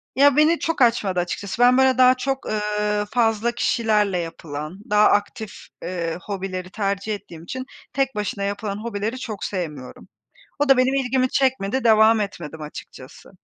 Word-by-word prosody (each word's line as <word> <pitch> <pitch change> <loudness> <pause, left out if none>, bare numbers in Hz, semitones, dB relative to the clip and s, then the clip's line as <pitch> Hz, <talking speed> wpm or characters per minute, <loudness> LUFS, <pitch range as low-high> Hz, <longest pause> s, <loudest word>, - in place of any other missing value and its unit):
Ya, 280 +1 +5
beni 315 +3 +4
çok 330 -4 -2
açmadı 215 -6 +3
açıkçası. 195 +5 -3
Ben, 250 +1 +6
böyle, 265 -1 +4
daha 255 0 +6
çok, 270 +1 -3
eee, 210 0 -1
fazla 225 -1 +1
kişilerle 215 -5 +1
yapılan, 160 0 -6
daha 210 0 +5
aktif, 205 +1 -1 0.3
eee, 170 -2 -3
hobileri 190 -2 -5
tercih 200 +1 -2
ettiğim 170 -5 -12
için 255 +9 -6 0.3
tek 270 -1 0
başına 205 -1 -3
yapılan 200 0 -3
hobileri 220 +2 -4
çok 215 -6 -6
sevmiyorum. 150 -9 -5 0.5
O 290 0 +1
da 270 - +7
benim 255 +1 +2
ilgimi 260 -1 +1
çekmedi, 260 -3 0
devam 220 0 +5
etmedim 165 -6 -5
açıkçası. 135 -3 -11
210 Hz, 150 wpm, -22 LUFS, 195-255 Hz, 0.5 s, da